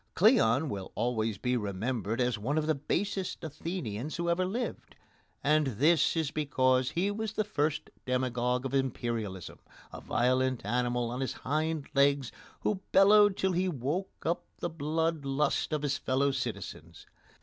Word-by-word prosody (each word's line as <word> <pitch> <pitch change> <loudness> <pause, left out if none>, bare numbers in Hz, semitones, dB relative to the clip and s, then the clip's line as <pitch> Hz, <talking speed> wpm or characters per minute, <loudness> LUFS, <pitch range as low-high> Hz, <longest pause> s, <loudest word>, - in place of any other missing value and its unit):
Cleon 160 - +4
will 100 -7 -5
always 115 -3 0
be 125 +5 0
remembered 110 +1 -2
as 125 -3 +1
one 135 +9 -1
of 155 - +1
the 155 - +2
basest 185 +6 -2
Athenians 155 - -4
who 170 0 0
ever 185 +2 +1
lived, 235 +7 -4 0.5
and 150 0 +3
this 160 +5 +4
is 155 -3 0
because 130 -4 +2
he 185 +7 0
was 220 +1 -3
the 215 - 0
first 150 -7 -1 0.2
demagogue 125 0 0
of 135 - -3
Imperialism 115 -8 -2 0.3
a - - -7
violent 130 -1 +1
animal 120 +1 0
on 125 +2 -3
his 130 - -1
hind 155 +1 0
legs 140 -2 +3 0.3
who 200 -3 -1
bellowed 205 0 +6
till 190 - +1
he 185 +1 +1
woke 155 +6 -3
up 170 +2 0
the 175 - -3
blood 160 0 -1
lust 140 +4 0
of 150 -1 -1
his 135 -2 0
fellow 140 +2 +1
citizens. 85 - -5
140 Hz, 155 wpm, -30 LUFS, 125-165 Hz, 0.5 s, bellowed